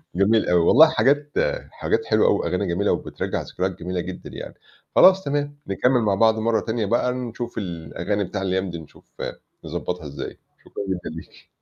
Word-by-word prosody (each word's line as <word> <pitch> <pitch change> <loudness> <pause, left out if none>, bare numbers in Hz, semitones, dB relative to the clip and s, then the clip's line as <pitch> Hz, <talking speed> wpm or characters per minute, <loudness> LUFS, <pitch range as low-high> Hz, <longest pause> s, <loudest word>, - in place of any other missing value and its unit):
جميل 105 +3 +3
أوي. 90 -1 +4
والله 150 - +7
حاجات 145 -1 +2 0.4
حاجات - - -1
حلوة - - +3
أوي - - +3
وأغاني 90 +2 -1
جميلة 90 +4 +1
وبترجَّع - - -2
ذكريات 95 0 -3
جميلة 90 +1 -3
جدًا 95 +1 -7
يعني. - - -8 0.4
خلاص 190 +1 +7
تمام، 145 0 -2
نكمِّل 125 +5 +2
مع 100 -3 +2
بعض 110 +1 +4
مرّة 115 0 +2
تانية 110 -1 -2
بقى، 120 +4 +1
نشوف 120 -1 -5
الأغاني 90 +2 -3
بتاع 95 +1 -4
الأيام 95 0 -1
دي، 85 -1 -6
نشوف 80 - -16 0.5
نضبطها 90 -3 -4
إزاي. 70 - -7 0.3
شكرًا - - -6
جدًا 90 -2 -3
ليكِ 80 - -12
100 Hz, 170 wpm, -23 LUFS, 90-125 Hz, 0.5 s, والله